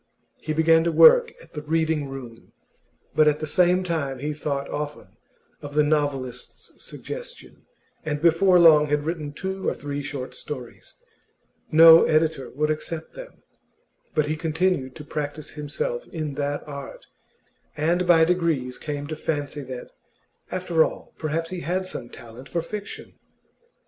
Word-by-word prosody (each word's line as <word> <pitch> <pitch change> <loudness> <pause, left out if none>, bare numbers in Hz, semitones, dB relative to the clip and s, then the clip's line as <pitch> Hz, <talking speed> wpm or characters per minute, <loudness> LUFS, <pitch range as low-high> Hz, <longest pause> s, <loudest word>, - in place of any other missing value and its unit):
He 155 - -4
began 160 +1 +4
to 170 - +2
work 480 - +7
at - - -20
the 150 - -5
Reading 160 -2 0
room, 125 -4 -10 0.6
but 155 -1 +4
at 150 0 +3
the 155 - -3
same 180 +4 +3
time 155 -7 -2
he 150 +4 -3
thought 140 -2 -3
often 150 0 -5 0.5
of 145 0 -8
the 150 - +5
novelist's 145 -4 -2
suggestion, - - -9 0.4
and 150 -2 -2
before 170 +3 +4
long 155 -3 +7
had 150 0 0
written 155 -3 -3
two 190 +5 -3
or - - -3
three 145 0 -5
short 135 -2 -6
stories. 130 -5 -9 0.8
No 165 +1 +9
editor 155 -3 +1
would 150 +3 -1
accept 155 +1 -5
them; - - -12 0.7
but 155 -2 +3
he 155 +1 -1
continued 160 -4 -1
to 150 - -9
practise 150 0 -5
himself 480 - -4
in 155 -4 -4
that 145 +1 -3
art, 140 -2 -8 0.7
and 170 +4 +1
by 165 -2 +6
degrees 160 -8 0
came 145 -1 -4
to 155 +2 -5
fancy 145 -2 -3
that, 130 -2 -8 0.6
after 175 -3 +2
all, - - -6
perhaps 165 +2 -2
he 185 - -4
had 180 +3 -2
some 125 -9 -6
talent 120 +3 -12
for 170 - -2
fiction. 205 +3 -8
155 Hz, 150 wpm, -24 LUFS, 145-170 Hz, 0.8 s, No